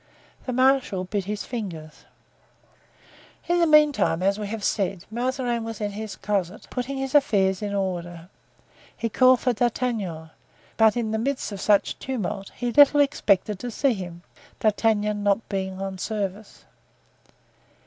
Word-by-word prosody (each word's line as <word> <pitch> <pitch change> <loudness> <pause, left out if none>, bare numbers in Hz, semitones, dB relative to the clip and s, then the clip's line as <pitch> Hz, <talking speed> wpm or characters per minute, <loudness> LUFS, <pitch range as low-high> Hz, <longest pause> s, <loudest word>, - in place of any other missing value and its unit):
The - - -1
marshal 255 -6 +2
bit 195 +1 -3
his 210 +1 -3
fingers. 170 -10 -7 1.4
In 345 +1 +2
the 340 - +4
meantime, 300 - +4
as 200 +2 +1
we 210 - -4
have 215 0 -5
said, 195 -3 -1
Mazarin 245 0 -1
was 225 -1 -6
in 205 -1 -2
his 215 +1 -6
closet, 200 -2 -2
putting 260 +2 -3
his 270 0 -3
affairs 195 -10 +3
in 205 -1 -3
order. 175 -3 -3 0.7
He 230 - -2
called 255 +2 +5
for 250 - +1
D'Artagnan, 215 -9 -2 0.4
but 220 +1 +4
in 225 -2 -1
the 220 - -1
midst 265 0 -2
of 200 -2 -6
such 205 -1 +2
tumult 210 -6 -4
he 245 -1 -2
little 290 +1 +7
expected 210 -8 +2
to 245 - -5
see 260 +3 +1
him, 175 -4 -8 0.4
D'Artagnan 210 -1 +1
not 205 +2 +1
being 190 -1 -3
on 195 -1 -5
service. 205 0 -5
210 Hz, 150 wpm, -24 LUFS, 195-245 Hz, 1.4 s, little